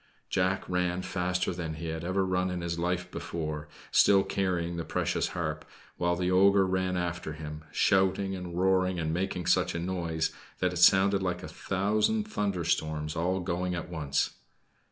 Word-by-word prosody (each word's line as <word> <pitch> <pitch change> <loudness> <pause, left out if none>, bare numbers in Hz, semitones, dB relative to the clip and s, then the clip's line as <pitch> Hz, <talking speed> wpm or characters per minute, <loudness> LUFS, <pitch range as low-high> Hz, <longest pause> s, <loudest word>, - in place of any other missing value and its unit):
Jack 95 +1 +1
ran 90 0 0
faster 90 0 -1
than 85 -3 -4
he 80 +1 -5
had 80 0 -4
ever 95 +2 +1
run 90 0 0
in 90 -1 -3
his 85 0 -3
life 90 +1 -1
before 75 -2 -4 0.2
still 100 -1 +6
carrying 90 -3 -1
the 85 - -3
precious - - 0
harp - - -2 0.3
while 85 0 +1
the 90 +1 0
ogre 100 +1 +5
ran 95 0 0
after 85 -2 -3
him, 75 0 -7
shouting 95 +1 +2
and 90 -2 -6
roaring 95 -1 +2
and 80 -2 -1
making 90 0 -2
such - - +2
a - - -1
noise 85 -3 -1 0.3
that - - 0
it - - -4
sounded 95 +1 +5
like 90 -1 -2
a - - -5
thousand 110 - 0
thunder 100 - -1
storms 80 -2 -1
all 90 +3 0
going 90 0 -1
at 85 - -5
once. 75 -5 -1
90 Hz, 175 wpm, -29 LUFS, 85-95 Hz, 0.3 s, still